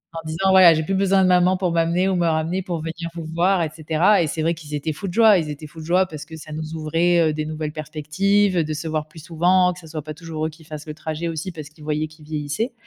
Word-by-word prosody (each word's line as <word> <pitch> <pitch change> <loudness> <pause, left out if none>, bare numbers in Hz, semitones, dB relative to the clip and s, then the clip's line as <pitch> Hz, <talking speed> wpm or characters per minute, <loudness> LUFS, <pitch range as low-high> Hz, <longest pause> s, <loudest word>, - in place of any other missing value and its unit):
en 165 - -3
disant: 170 +5 0
«Voilà, 185 -3 +8
j'ai 160 - 0
plus 195 - -2
besoin 195 0 +3
de - - +4
maman 180 0 +4
pour 180 -2 0
m'amener 170 +3 +1
ou 195 - +1
me 175 -1 +1
ramener 165 +4 0
pour 175 -4 -4
venir 170 +1 -5
vous 165 -2 -5
voir», 180 +1 +2
et 155 - -2
cetera, 165 +5 +3
et 160 - +1
c'est 155 +1 -3
vrai 165 - +2
qu'ils 155 -3 -7
étaient 150 +2 -2
fous 195 +6 -6
de 175 - -5
joie. 220 -2 +6
Ils 155 -2 -3
étaient 150 +1 -7
fous 155 +2 -12
de 155 - -8
joie 180 +2 +3
parce 155 -4 -8
que 160 0 -10
ça 155 - -11
nous 155 +1 -5
ouvrait, 165 +1 +2
heu, 155 - -1
des 155 0 -3
nouvelles 155 -1 -4
perspectives, 180 +6 0
de 155 0 -3
se 155 +2 -5
voir 155 -1 -2
plus 155 - -18
souvent, 180 +2 +3
que 175 - -12
ça 165 - -13
soit 155 -1 -6
pas 155 +1 -6
toujours 160 -1 -5
eux - - -1
qui 160 +1 -17
fassent 150 0 -8
le 155 - -6
trajet 155 +2 -4
aussi, 165 +3 -4
parce 155 -4 -9
qu'ils 155 0 -17
voyaient 155 0 -1
qu'ils 155 0 -17
vieillissaient, 150 - -3
160 Hz, 290 wpm, -22 LUFS, 155-180 Hz, -, Voilà